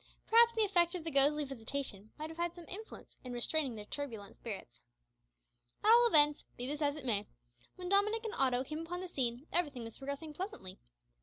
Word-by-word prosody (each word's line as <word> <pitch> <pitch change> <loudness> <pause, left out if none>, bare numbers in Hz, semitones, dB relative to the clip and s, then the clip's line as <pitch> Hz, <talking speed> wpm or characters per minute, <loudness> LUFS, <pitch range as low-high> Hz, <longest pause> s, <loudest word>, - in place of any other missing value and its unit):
Perhaps 465 +1 +5
the 445 - +3
effect 350 -4 +3
of 350 - -4
the 325 - -3
ghostly 290 +2 +5
visitation 240 -5 -4
might 310 +1 -5
have 325 - -11
had 345 0 -2
some 345 -2 -10
influence 435 +4 -7
in 250 -1 -6
restraining 260 +1 +1
their 210 -1 -7
turbulent 225 -7 -6
spirits. 200 - -8 1.0
At 430 - +6
all 475 +1 +7
events, 295 -7 +5
be 245 - -4
this 295 +3 -3
as 285 -1 +1
it 300 -4 -8
may, 210 -5 0 0.5
when 360 -1 -6
Dominick 420 +3 +3
and 440 - -3
Otto 255 -2 +1
came 305 +3 -5
upon 345 +2 -5
the 370 - -5
scene 250 -5 -2
everything 290 -8 0
was 225 -1 -9
progressing 280 +3 -5
pleasantly. 330 - -7
295 Hz, 200 wpm, -34 LUFS, 250-355 Hz, 1.0 s, all